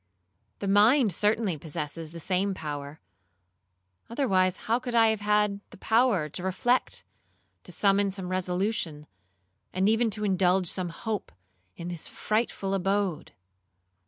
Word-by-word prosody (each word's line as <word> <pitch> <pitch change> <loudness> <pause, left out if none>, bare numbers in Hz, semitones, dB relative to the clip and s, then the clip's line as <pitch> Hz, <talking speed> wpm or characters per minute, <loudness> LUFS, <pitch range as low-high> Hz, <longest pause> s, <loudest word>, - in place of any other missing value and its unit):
The 200 - -4
mind 210 +3 +5
certainly 210 -3 +1
possesses 155 +1 -5
the 170 - -8
same 190 +3 0
power, 145 -2 -6 1.1
otherwise, 190 -7 +1
how 230 +2 +2
could 245 -1 -4
I 225 -1 +6
have 220 -1 0
had 210 -1 +1
the - - -14
power 220 -6 +2
to 155 - -6
reflect, 215 +7 0 0.6
to - - -9
summon 200 0 +2
some 190 -2 -5
resolution, 185 -3 -2 0.7
and 190 +2 +1
even 225 +2 +3
to 210 0 -2
indulge 185 -2 +2
some 180 +1 -2
hope, 215 +5 -4 0.5
in 170 - -6
this 170 -2 -5
frightful 215 -3 -1
abode? 195 -3 -1
195 Hz, 130 wpm, -27 LUFS, 180-215 Hz, 1.1 s, I